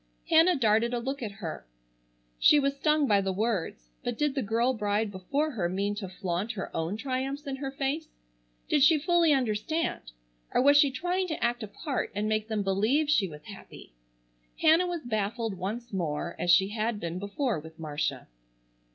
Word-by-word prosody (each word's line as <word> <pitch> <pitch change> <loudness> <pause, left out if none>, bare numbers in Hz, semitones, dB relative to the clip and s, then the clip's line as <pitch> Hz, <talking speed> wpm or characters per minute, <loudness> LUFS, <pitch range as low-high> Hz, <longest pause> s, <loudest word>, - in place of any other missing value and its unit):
Hannah 335 +3 +6
darted 235 -1 +2
a - - -1
look 270 +3 -4
at 215 -4 -4
her. 170 - -6 0.8
She 300 - +6
was 275 0 0
stung 300 +1 +2
by 205 -6 +3
the 195 0 -1
words. 190 - -2
But 245 -2 -3
did 295 -2 +1
the 270 - -1
girl 235 +4 +1
bride 210 -1 -1
before 275 +12 -1
her 190 -10 -1
mean 200 +3 -1
to 195 -3 -5
flaunt 185 +3 -3
her 195 - -6
own 165 +6 -2
triumphs 270 +4 -3
in 270 -1 -4
her 270 0 -4
face? 275 +3 -2 0.6
Did 290 - +2
she 305 +3 +6
fully 340 +1 +3
understand? 250 - -1 0.4
Or - - +5
was 285 +1 +6
she 290 -1 +6
trying 355 +7 -1
to 315 -7 -4
act 240 +1 0
a 215 - -4
part 275 +6 -3
and 210 +1 -1
make 215 0 0
them 215 -2 -1
believe 220 +11 +2
she 205 -10 +3
was 150 -3 -11
happy? 200 - -12 0.7
Hannah 330 +3 +5
was 350 -2 -3
baffled 220 0 -2
once 220 +5 -5
more 170 -2 -2
as 175 - -2
she 190 +2 +5
had 215 0 -2
been 170 0 -4
before 205 - -2
with 160 +1 -12
Marcia. 150 -2 -3
225 Hz, 185 wpm, -28 LUFS, 195-280 Hz, 0.8 s, Hannah